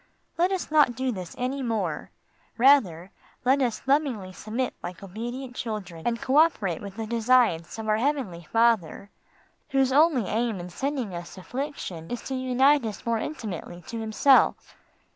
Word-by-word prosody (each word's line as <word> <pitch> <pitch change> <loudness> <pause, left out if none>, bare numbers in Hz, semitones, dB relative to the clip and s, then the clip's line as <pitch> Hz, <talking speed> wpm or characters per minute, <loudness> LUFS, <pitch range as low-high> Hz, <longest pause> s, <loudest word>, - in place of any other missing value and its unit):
Let 355 +3 +2
us 375 -5 -3
not 295 -6 +4
do 260 +1 -1
this 185 -6 -7
any 255 +2 -2
more, 230 -4 -2 0.5
rather 220 - +4 0.3
let 270 +2 +4
us 240 -4 -1
lovingly 260 -9 0
submit 235 +6 -3
like 180 +2 -7
obedient 240 +6 -6
children 195 -9 -5
and 235 -1 0
co 265 +2 +1
operate 215 - +3
with 200 -1 -8
the 225 0 -4
designs 230 -7 +2
of 220 -1 -5
our 215 0 +3
heavenly 225 - -2
Father, 225 -5 +1 0.6
whose 270 -1 +2
only 295 -4 +4
aim 220 0 -1
in 175 0 -7
sending 265 -3 -3
us 175 +2 -8
affliction 190 - -6
is 245 - -5
to 270 - -5
unite 260 +2 +3
us 215 -2 -6
more 230 -1 +1
intimately 185 - -6
to 230 - -4
Himself. 225 +5 +3
235 Hz, 160 wpm, -26 LUFS, 200-265 Hz, 0.6 s, not